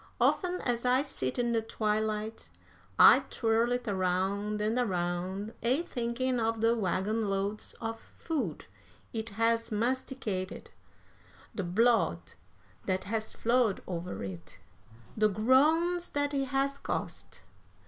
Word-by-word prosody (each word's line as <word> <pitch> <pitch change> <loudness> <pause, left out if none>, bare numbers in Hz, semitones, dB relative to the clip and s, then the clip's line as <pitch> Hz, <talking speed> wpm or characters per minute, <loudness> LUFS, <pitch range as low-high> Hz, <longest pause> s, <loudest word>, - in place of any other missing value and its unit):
"Often 360 -1 +2
as 240 -1 -1
I 255 +2 +3
sit 130 - -3
in 240 -1 +1
the 230 -1 +2
twilight, 215 0 -2 0.5
I - - +9
twirl 230 +1 +1
it 245 -1 -1
around 195 +2 0
and 215 +4 0
around, 185 0 -2
a 260 +8 +2
thinking 250 -3 -1
of 225 0 0
the 230 +1 +3
wagon 210 +1 0
loads 200 +2 -2
of 225 0 -4
food 255 - -4 0.5
it 220 0 -3
has 230 0 +2
masticated, 230 -4 -2 0.8
the 200 - -3
blood 175 - +2 0.5
that 185 -1 0
has 220 +2 -3
flowed 235 -3 +1
over 180 0 -5
it, 95 -3 -8 0.6
the 215 -1 +3
groans 310 - +3
that 285 0 -1
it 275 -1 +1
has 275 +1 0
cost! - - -5
225 Hz, 125 wpm, -30 LUFS, 195-250 Hz, 0.8 s, I